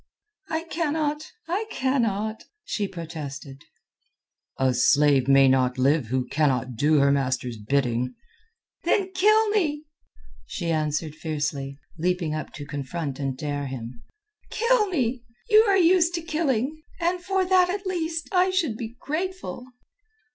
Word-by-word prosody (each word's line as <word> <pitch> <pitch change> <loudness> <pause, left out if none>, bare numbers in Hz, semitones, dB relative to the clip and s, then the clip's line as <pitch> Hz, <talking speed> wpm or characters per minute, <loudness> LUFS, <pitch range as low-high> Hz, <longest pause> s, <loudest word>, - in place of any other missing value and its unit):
"I 320 0 -1
cannot! 310 -2 -2 0.2
I 380 +6 -1
cannot!" 225 - -1 0.2
she 205 -2 -2
protested. 150 -5 -8 0.9
"A 130 -1 +2
slave 140 0 +4
may 135 0 +6
not 130 -1 +2
live 135 0 +2
who 130 +2 -1
cannot 130 -4 0
do 150 +6 +3
her 140 0 +4
master's 130 -3 -1
bidding." 125 +1 0 0.7
"Then 385 -2 +1
kill 430 +3 +4
me," 310 -8 0 0.6
she 170 -1 -3
answered 155 0 -1
fiercely, 150 -3 -3 0.2
leaping 175 -2 0
up 155 -1 -4
to 145 -4 -7
confront 145 0 -4
and 135 -2 -2
dare 145 -1 -3
him. 120 -2 -7 0.5
"Kill 465 -1 +2
me. 260 -9 -1 0.3
You 430 +1 +7
are 395 -2 +4
used 350 -1 +4
to 335 - -3
killing, 305 -3 -1 0.2
and 350 +1 0
for 380 0 +1
that 365 -1 +4
at 395 +2 -3
least 330 -3 -2
I 370 -1 +3
should 335 - 0
be 230 0 -6
grateful." 310 - -4
180 Hz, 135 wpm, -25 LUFS, -, 0.9 s, You